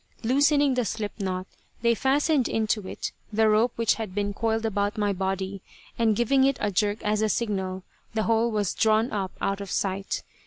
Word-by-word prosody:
Loosening 285 +3 +3
the 250 -1 +1
slip 215 0 -4
knot 185 -2 -2 0.4
they 235 0 +4
fastened 275 +3 +2
into 215 -3 0
it - - -5 0.2
the 220 +1 +3
rope 215 +3 +3
which 230 -2 +2
had 200 -4 -6
been 205 0 -1
coiled 225 +1 -1
about 205 0 -1
my 205 -1 +1
body, 190 0 -3 0.3
and 225 -2 +2
giving 265 +4 +3
it 275 -1 +3
a 210 - 0
jerk 205 +2 0
as 210 0 +1
a 220 - +2
signal 190 -5 -2 0.3
the 220 - +1
whole 230 +1 +2
was 210 -4 0
drawn 220 +2 +2
up 195 -3 -2
out 195 0 -1
of 200 - -6
sight. 195 +1 -2
215 Hz, 190 wpm, -26 LUFS, 200-230 Hz, 0.4 s, they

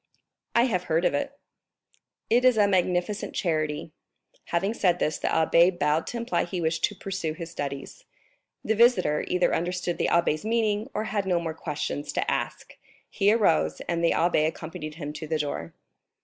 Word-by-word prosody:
"I 235 - +6
have 185 -8 0
heard 165 +2 +1
of - - +2
it." 280 0 -2 0.9
"It 240 +2 +3
is 255 -3 +5
a 205 -1 +5
magnificent 185 +1 0
charity." 155 -3 -1 0.5
Having 195 +5 0
said 180 -6 +2
this, 155 - -1
the - - -2
abbé 170 +3 +4
bowed 150 +1 +1
to 240 - -4
imply 235 +1 0
he 175 +1 -4
wished 160 -1 -1
to 205 - -6
pursue 190 -5 -3
his 165 0 -8
studies. 140 -4 -6 0.6
The 220 - +2
visitor 215 -10 +3
either 180 0 +2
understood 175 0 -2
the - - +1
abbé's 170 -1 +2
meaning, 220 0 0
or 215 - 0
had 205 -2 -2
no 180 -2 +2
more 165 -1 -3
questions 150 -2 -4
to - - 0
ask; - - -4 0.4
he 200 0 +3
arose, 80 - +2
and 170 -1 -2
the 170 - +4
abbé 165 -2 +2
accompanied 160 -1 -6
him 150 -2 -6
to 155 +1 -7
the 160 0 0
door. 145 - -3
175 Hz, 175 wpm, -26 LUFS, 155-205 Hz, 0.9 s, I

